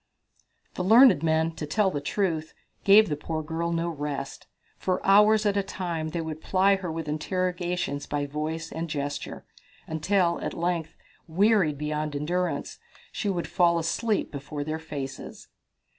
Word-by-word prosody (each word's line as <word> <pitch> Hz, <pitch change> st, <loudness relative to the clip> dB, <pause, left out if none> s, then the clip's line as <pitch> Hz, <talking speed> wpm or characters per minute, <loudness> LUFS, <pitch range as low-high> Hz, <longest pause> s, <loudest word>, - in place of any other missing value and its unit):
The 180 Hz, -, -3 dB
learned 230 Hz, -, +7 dB
men, 160 Hz, 0 st, +2 dB
to 150 Hz, -, -4 dB
tell 195 Hz, +5 st, +2 dB
the 145 Hz, -, -3 dB
truth, 160 Hz, 0 st, -2 dB, 0.3 s
gave 210 Hz, +2 st, +7 dB
the 150 Hz, -, -1 dB
poor 155 Hz, +2 st, -4 dB
girl 165 Hz, +2 st, -2 dB
no 170 Hz, 0 st, 0 dB
rest. 145 Hz, -4 st, -5 dB, 0.3 s
For 185 Hz, -1 st, 0 dB
hours 210 Hz, +2 st, +5 dB
at 205 Hz, -1 st, +2 dB
a 200 Hz, -, +2 dB
time 175 Hz, -4 st, -4 dB
they 165 Hz, +1 st, -3 dB
would 160 Hz, -1 st, -6 dB
ply 195 Hz, +3 st, +3 dB
her 180 Hz, -3 st, -5 dB
with 160 Hz, -1 st, -5 dB
interrogations 175 Hz, -1 st, -2 dB
by 145 Hz, -1 st, -1 dB
voice 155 Hz, +3 st, -4 dB
and 165 Hz, +1 st, -4 dB
by 150 Hz, -, -4 dB
gesture, 145 Hz, 0 st, -4 dB, 0.4 s
until, 170 Hz, +2 st, +1 dB
at -, -, -4 dB
length, 165 Hz, -2 st, -2 dB, 0.3 s
wearied 185 Hz, -3 st, +3 dB
beyond 150 Hz, 0 st, -3 dB
endurance, 175 Hz, +5 st, -2 dB, 0.3 s
she 205 Hz, -, -2 dB
would 175 Hz, -3 st, -1 dB
fall 175 Hz, -2 st, +3 dB
asleep 195 Hz, +7 st, -1 dB
before 145 Hz, +1 st, -5 dB
their 155 Hz, +2 st, -3 dB
faces. 140 Hz, -4 st, -7 dB
165 Hz, 160 wpm, -26 LUFS, 150-185 Hz, 0.4 s, learned